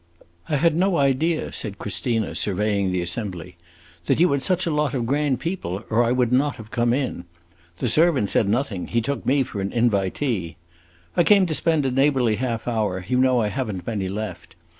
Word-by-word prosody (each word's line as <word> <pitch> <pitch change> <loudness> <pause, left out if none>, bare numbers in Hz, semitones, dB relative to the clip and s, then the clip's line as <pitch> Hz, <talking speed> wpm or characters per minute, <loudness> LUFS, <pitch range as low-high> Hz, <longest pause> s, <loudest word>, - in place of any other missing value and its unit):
"I 150 - +1
had 160 +2 +3
no 185 +1 +2
idea," 145 +4 +1
said 100 -2 -5
Christina, 110 +2 -2
surveying 100 0 0
the 90 -1 -1
assembly, 90 -1 -5 0.5
"that - - +1
you 175 -1 +4
had 140 -1 +1
such 185 +2 +2
a 170 - 0
lot 150 -3 0
of 120 -3 -1
grand 140 0 0
people, 125 - -4
or 115 +2 +4
I 120 - +1
would 125 -1 +1
not 140 +3 +2
have 110 -1 -12
come 120 0 +1
in. 125 -9 -2 0.5
The 125 - -1
servant 145 - +2
said 100 - +2
nothing; 110 -5 -1
he 115 - 0
took 140 +5 -3
me 135 +1 +3
for 105 -6 -6
an 95 - -2
invitee. 105 - 0 0.6
I 175 - +4
came 200 +1 +5
to 165 - -2
spend 160 -2 +1
a 130 - +1
neighborly 130 -4 +2
half 115 -2 -3
hour; 105 -6 -1
you 125 +2 +1
know 130 -2 +3
I 105 - 0
have 130 -1 -3
n't 95 -3 -7
many 100 -5 -2
left! 95 -4 -6
120 Hz, 205 wpm, -23 LUFS, 105-140 Hz, 0.6 s, came